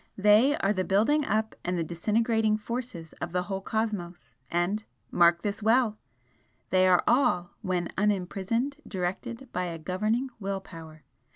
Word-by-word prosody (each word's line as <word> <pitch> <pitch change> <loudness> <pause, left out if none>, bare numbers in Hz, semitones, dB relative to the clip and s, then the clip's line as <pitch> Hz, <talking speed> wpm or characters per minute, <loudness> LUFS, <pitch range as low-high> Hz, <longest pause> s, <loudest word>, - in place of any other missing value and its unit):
They 210 +8 +5
are 195 +1 +1
the 185 -2 -1
building 225 +11 +2
up 220 0 0
and 180 0 -1
the 170 - 0
disintegrating 215 +6 +1
forces 230 -7 -6
of - - -4
the 180 0 +1
whole 195 0 -4
cosmos 205 -5 -3
and 175 +5 0 0.3
mark 170 0 +4
this 205 +1 -2
well! 220 0 +3 0.7
they 185 0 +4
are 180 -1 +4
all, 180 -9 +2
when 180 -2 -1
unimprisoned, 210 +6 0
directed 215 +7 -4
by 180 0 -1
a 170 -2 -4
governing 215 +10 -1
will 195 -1 -2
power. 160 -5 -12
200 Hz, 150 wpm, -28 LUFS, 180-225 Hz, 0.7 s, They